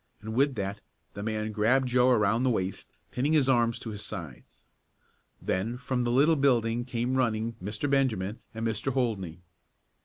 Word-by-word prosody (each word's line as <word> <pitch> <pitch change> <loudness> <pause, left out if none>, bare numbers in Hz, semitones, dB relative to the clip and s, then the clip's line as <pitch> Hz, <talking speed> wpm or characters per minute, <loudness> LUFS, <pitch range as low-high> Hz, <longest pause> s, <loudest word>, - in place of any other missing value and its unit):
and 110 +1 -6
with 135 +3 +2
that 100 -1 -3 0.3
the 100 - -6
man 110 0 -2
grabbed 120 +5 +2
Joe 125 0 +4
around 110 -2 +3
the 130 - +2
waist, 95 -5 -2 0.2
pinning 140 +5 0
his 145 -4 +4
arms 120 -3 +3
to 115 - -6
his 105 -1 -7
sides. 85 - -9 0.7
Then 110 +6 -2
from 125 -1 -1
the 120 - +1
little 145 +6 +4
building 120 -4 +2
came 125 0 -2
running 115 -2 0
Mr. 105 +7 -2
Benjamin 120 -7 0 0.2
and 115 +1 -3
Mr. 110 +3 -1
Holdney. 100 -10 -2
115 Hz, 165 wpm, -28 LUFS, 105-130 Hz, 0.7 s, Joe